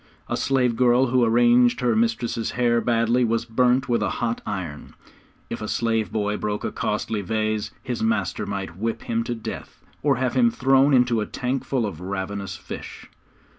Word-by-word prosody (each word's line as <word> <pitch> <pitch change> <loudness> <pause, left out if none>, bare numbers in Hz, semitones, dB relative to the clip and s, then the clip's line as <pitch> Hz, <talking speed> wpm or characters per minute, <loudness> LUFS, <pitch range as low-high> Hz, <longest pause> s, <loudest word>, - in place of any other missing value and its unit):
A - - -1
slave 125 -3 +1
girl 125 +1 +4
who 125 -1 +4
arranged 120 +1 +4
her 120 -2 +2
mistress's 115 0 0
hair 120 -1 +2
badly 120 +1 +2
was 115 0 0
burnt 125 +2 +2
with 120 -3 +1
a 105 - +1
hot 120 -1 -1
iron. 85 -7 -5 0.5
If - - -6
a 110 - -4
slave 115 -1 0
boy 105 -1 -1
broke 105 0 -3
a - - -2
costly 110 -2 -2
vase 110 +2 -1
his 125 -2 -4
master 105 -2 0
might 100 -4 -4
whip 115 +3 -3
him 115 0 -1
to 120 - -2
death, 110 -1 -7 0.2
or 140 -2 +3
have 125 +1 -1
him 240 -2 +4
thrown 135 - +4
into 125 -3 +3
a 105 - -3
tank 130 +1 -2
full 130 -4 -1
of 95 -7 -5
ravenous 95 +1 -4
fish. - - -9
115 Hz, 180 wpm, -24 LUFS, 105-125 Hz, 0.5 s, girl